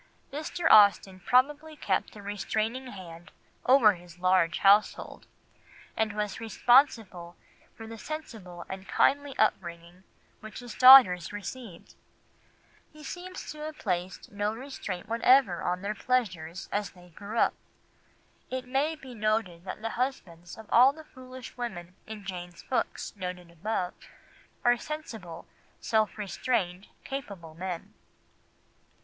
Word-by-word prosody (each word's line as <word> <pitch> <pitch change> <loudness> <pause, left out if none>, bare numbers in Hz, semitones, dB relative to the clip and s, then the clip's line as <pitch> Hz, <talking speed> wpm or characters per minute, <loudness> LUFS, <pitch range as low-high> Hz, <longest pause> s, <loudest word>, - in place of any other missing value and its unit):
Mr. 315 +3 -2
Austen 200 -2 +6
probably 295 - +1
kept 195 -8 -2
a 205 - -11
restraining 215 +5 -2
hand 175 -6 -10 0.4
over 250 -5 +6
his 175 -1 -14
large 185 -1 +2
household, 205 +2 +2 0.7
and 220 -1 0
was 210 -1 -3
responsible 225 -6 +2 0.4
for 225 - -9
the 225 0 -9
sensible 215 - -8
and 190 0 -8
kindly 285 0 +1
upbringing 175 -3 -1 0.4
which 215 -1 -10
his 245 -2 -8
daughters 245 -10 +8
received; 205 -2 -8 1.0
he 305 0 -14
seems 365 +3 -7
to 305 - -10
have 305 0 -6
placed 180 -2 -3
no 205 +1 -1
restraint 225 -7 -6
whatever 230 -5 +3
on 180 +1 -2
their 205 +1 -2
pleasures 190 -8 -2
as 205 0 -1
they 180 -1 -18
grew 205 +6 -8
up. - - +3 1.0
It 255 0 -4
may 275 +5 0
be 265 -5 -12
noted 215 -6 -1
that 215 - -7
the 225 - -2
husbands 180 -10 -4
of 220 - -11
all 255 +4 +7
the 315 +1 -12
foolish 255 -3 -12
women 180 -8 -6
in 215 -2 -8
Jane's 175 -2 -7
books 255 - -3
noted 180 -2 -6
above 180 +1 -3 0.7
are 240 0 +5
sensible, 225 - -7 0.3
self 220 -1 0
restrained, 200 -3 -2 0.2
capable 200 - -7
men. 175 0 -6
210 Hz, 130 wpm, -28 LUFS, 180-255 Hz, 1.0 s, daughters